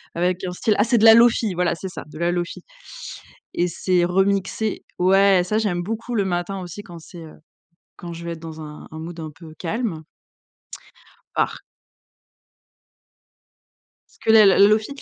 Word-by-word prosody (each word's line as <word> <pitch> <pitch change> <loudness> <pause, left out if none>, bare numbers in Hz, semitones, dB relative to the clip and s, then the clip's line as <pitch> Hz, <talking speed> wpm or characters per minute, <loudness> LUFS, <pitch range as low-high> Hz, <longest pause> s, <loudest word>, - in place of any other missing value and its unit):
avec 180 +2 -1
un 180 - -3
style 210 +4 0
ah 205 - +4
c'est 235 +2 +2
de 220 - +4
la 225 - +10
Lo-fi 230 -3 +4
voilà 175 -1 0
c'est 190 +3 -7
ça 185 - -8
de 155 - -12
la 170 +1 +1
Lo-fi 175 -1 -4 0.9
et 175 - +1
c'est 180 +1 0
remixé 195 +3 0 0.2
ouais 190 0 +4
ça 215 +3 -1
j'aime 190 -5 0
beaucoup 225 +5 -5
le 200 - +1
matin 180 +1 -2
aussi 185 +3 -8
quand 170 -3 -11
c'est, 170 +1 -12
heu, 155 - -12 0.6
quand 175 - -8
je 170 +1 -9
vais 170 - -4
être 165 - -10
dans 160 -1 -9
un 150 -1 -10
un 160 - -8
mood 170 +1 -8
un 155 -1 -7
peu 160 0 -13
calme. 185 -3 -3 1.3
Par - - 0 2.6
Que 220 - +3
le 220 -1 +8
la 195 - +5
Lo-fi, 215 +2 +5
180 Hz, 170 wpm, -22 LUFS, 170-205 Hz, 2.6 s, la